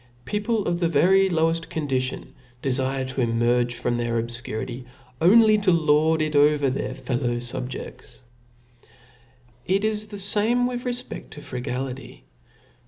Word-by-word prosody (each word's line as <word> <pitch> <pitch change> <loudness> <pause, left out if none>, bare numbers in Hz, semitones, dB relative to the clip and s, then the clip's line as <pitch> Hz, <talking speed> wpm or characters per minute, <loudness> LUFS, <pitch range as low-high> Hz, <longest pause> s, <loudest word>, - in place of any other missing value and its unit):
Peq>le 210 0 -1
of 175 0 0
the 170 - +2
very 190 +5 +4
loweft 165 -1 0
condition 135 -4 -3 0.3
defire 130 0 -1
to 130 0 -3
emerge 120 +1 +1
from 120 0 -1
their 120 -1 -1
obfturity^: 120 +1 -5 0.4
only 215 +4 +6
to 200 -3 +2
lord 160 -1 +3
it 155 -1 -2
over 145 -1 +4
their 135 - -3
fellow 120 -2 -2
fubjeds. 125 +2 -7 1.5
It 195 +3 +1
is 215 -1 -1
the 205 -1 -8
fame 215 +5 +3
with 245 0 -3
refped 245 0 -5
to 150 - -10
frugality. 125 0 -6
150 Hz, 130 wpm, -24 LUFS, 125-195 Hz, 1.5 s, only